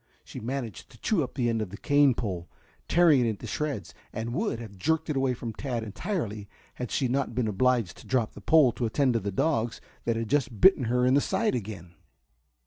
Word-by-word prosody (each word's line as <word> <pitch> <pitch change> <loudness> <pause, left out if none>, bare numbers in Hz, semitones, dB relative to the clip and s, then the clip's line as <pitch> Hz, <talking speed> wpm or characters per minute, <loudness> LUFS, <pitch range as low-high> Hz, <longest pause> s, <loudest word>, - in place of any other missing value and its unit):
She - - -9
managed 120 -2 -5
to 120 - -17
chew 185 - +1
up 130 - -4
the 125 -4 +1
end 115 -1 0
of 105 - -3
the 100 - -8
cane 145 0 +4
pole, 90 -7 -4 0.4
tearing 170 -5 +5
it - - +1
into 105 -3 -5
shreds, 110 - -3 0.2
and 115 +1 -4
would 210 - -1
have 110 -4 -9
jerked 160 - 0
it - - -2
away 135 -2 +1
from 115 -1 -6
Tad 120 -1 -3
entirely 110 - -4 0.2
had 125 -2 -5
she 135 - 0
not 130 -1 -1
been 125 -2 +1
obliged 115 0 +1
to - - -14
drop 125 -4 +1
the - - -11
pole 150 +1 +5
to 120 0 -2
attend 130 +3 +2
to 115 - +2
the 100 0 -3
dogs 120 - 0 0.3
that 115 - +1
had 115 0 -2
just 135 -4 0
bitten 165 - +6
her 125 +2 +2
in 130 - +4
the 140 - +5
side 225 +8 0
again. 100 -7 -5
120 Hz, 225 wpm, -28 LUFS, 110-140 Hz, 0.4 s, bitten